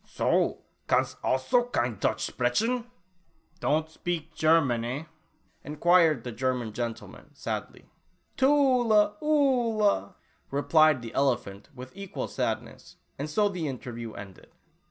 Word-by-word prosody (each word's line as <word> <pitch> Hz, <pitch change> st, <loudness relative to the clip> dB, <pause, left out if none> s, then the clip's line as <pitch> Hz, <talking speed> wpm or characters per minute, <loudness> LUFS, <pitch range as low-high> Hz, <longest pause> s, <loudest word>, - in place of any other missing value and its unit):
"So? -, -, 0 dB, 0.2 s
Kannst -, -, +1 dB
also 130 Hz, -, +2 dB
kein 120 Hz, -, -2 dB
Deutsch -, -, 0 dB
sprechen? 230 Hz, -, 0 dB, 0.7 s
Don't 155 Hz, +2 st, +1 dB
shpeak 160 Hz, 0 st, -5 dB
chermans, 155 Hz, -7 st, +3 dB, 0.2 s
eh?" -, -, -12 dB, 0.6 s
enquired 155 Hz, -2 st, +3 dB
the 125 Hz, -, -5 dB
Ger 130 Hz, +2 st, 0 dB
man 115 Hz, -4 st, -5 dB
gentleman, 115 Hz, 0 st, -6 dB
sadly. -, -, -5 dB, 0.5 s
"Tula 250 Hz, -7 st, +3 dB
Oolah," 240 Hz, -, +2 dB, 0.3 s
replied 150 Hz, -1 st, +3 dB
the 115 Hz, -, -8 dB
elephant 120 Hz, -7 st, -1 dB
with 130 Hz, +3 st, -10 dB
equal 195 Hz, -1 st, -5 dB
sadness, -, -, -4 dB, 0.2 s
and 145 Hz, +2 st, -3 dB
so 205 Hz, +7 st, +2 dB
the 180 Hz, -6 st, -3 dB
interview 120 Hz, -4 st, -6 dB
ended. 95 Hz, -2 st, -11 dB
155 Hz, 115 wpm, -27 LUFS, -, 0.7 s, chermans